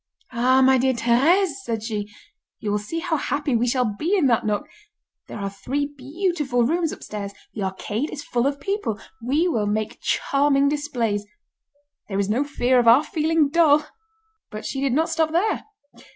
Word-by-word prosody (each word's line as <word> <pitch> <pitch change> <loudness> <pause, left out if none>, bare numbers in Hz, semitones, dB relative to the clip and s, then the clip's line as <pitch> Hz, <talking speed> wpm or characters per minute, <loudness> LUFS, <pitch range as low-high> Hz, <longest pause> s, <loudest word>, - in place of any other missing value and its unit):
"Ah! 255 +2 +3
my 260 0 +5
dear 260 +1 +2
Thérèse," 285 +11 +3
said 225 -3 -3
she, 210 -2 -3 0.5
"you 210 - -3
will 210 - +1
see 330 +11 -5
how 335 -2 0
happy 285 -1 -1
we 235 +2 +1
shall 250 +1 +1
be 300 - 0
in 340 - +2
that 240 -2 +3
nook! 210 +8 -1 0.6
There - - -7
are 200 -1 -3
three 280 +8 -3
beautiful 285 -2 -1
rooms 325 +5 +1
upstairs. 200 -1 -6 0.2
The 215 - -5
arcade 205 +7 -3
is 290 - -7
full 245 +2 0
of 280 0 -2
people. 280 - -2 0.2
We 285 +9 +1
will 220 -11 0
make 215 +1 -2
charming 280 0 +2
displays. 235 -9 -2 0.8
There 195 - -2
is 200 0 0
no 240 +7 +2
fear 260 -3 +2
of 240 - +1
our 240 +6 +7
feeling 315 -2 +1
dull." 305 -2 +4 0.6
But 215 0 -7
she 270 - -3
did 275 -3 +1
not 320 +4 +2
stop 320 -1 +1
there. 395 +6 +1
265 Hz, 180 wpm, -23 LUFS, 225-300 Hz, 0.8 s, our